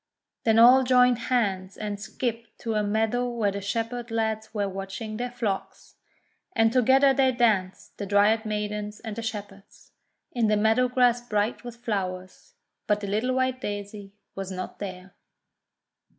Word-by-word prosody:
Then 225 -1 +4
all 245 +3 +8
joined 250 -1 +4
hands, 195 -6 0
and 210 -1 -4
skipped 230 +2 -4
to 225 - -2
a 215 - +1
meadow 220 +4 0
where 225 -4 0
the 200 +1 -5
Shepherd 230 +4 -3
lads 220 -1 -2
were 205 -2 -1
watching 195 +3 -6
their 245 +1 -3
flocks. 225 -5 -4 0.6
And 225 0 +3
together 265 +2 +5
they 265 -1 +3
danced, 215 -7 0
the 200 - -4
Dryad 205 +3 +3
Maidens 210 -1 -3
and 220 -3 -6
the 230 - -4
Shepherds, 205 -3 -8 0.4
in 235 -3 +1
the 210 0 +3
meadow 220 +4 +3
grass 245 -1 +3
bright 210 +4 0
with 240 -1 -8
flowers. 185 - -4 0.3
But 210 -1 +1
the 200 - -4
little 220 +6 0
white 260 0 0
Daisy 205 -1 -6 0.2
was 195 -1 -6
not 185 0 -6
there. 185 -1 -7
220 Hz, 155 wpm, -26 LUFS, 205-240 Hz, 0.6 s, all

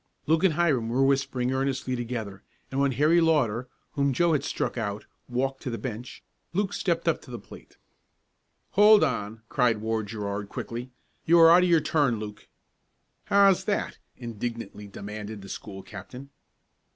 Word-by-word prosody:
Luke 160 +2 +2
and 180 -5 +4
Hiram 145 -9 +1
were 130 +3 +2
whispering 135 -2 +1
earnestly 135 -1 -1
together 115 -5 -5 0.3
and 135 - -1
when 140 -1 +2
Harry 155 +7 +4
Lauter, 130 -7 +2 0.2
whom 140 -1 +1
Joe 170 +5 +3
had 150 - +1
struck - - -2
out 105 -3 -3 0.2
walked 135 +2 -1
to - - -4
the 115 - -3
bench, 120 -1 -7 0.3
Luke 200 +2 0
stepped - - -1
up - - +2
to - - -15
the - - -5
plate. - - -14 0.9
"Hold 210 -1 +7
on!" 110 -5 -2
cried 120 -4 +2
Ward 110 0 -2
Gerard 100 -2 -4
quickly. 120 +2 -6 0.4
"You 170 +1 +6
are 165 0 +9
out 175 +2 +7
of 180 - +2
your 165 -2 +5
turn, 145 -9 +1
Luke." 105 -1 -8 0.8
"How's 195 -1 +4
that?" 205 - -2 0.2
indignantly 115 -3 -6
demanded 105 +1 -7
the 100 - -10
school 95 -1 -8
captain. 125 +7 -10
125 Hz, 165 wpm, -27 LUFS, 110-150 Hz, 0.9 s, are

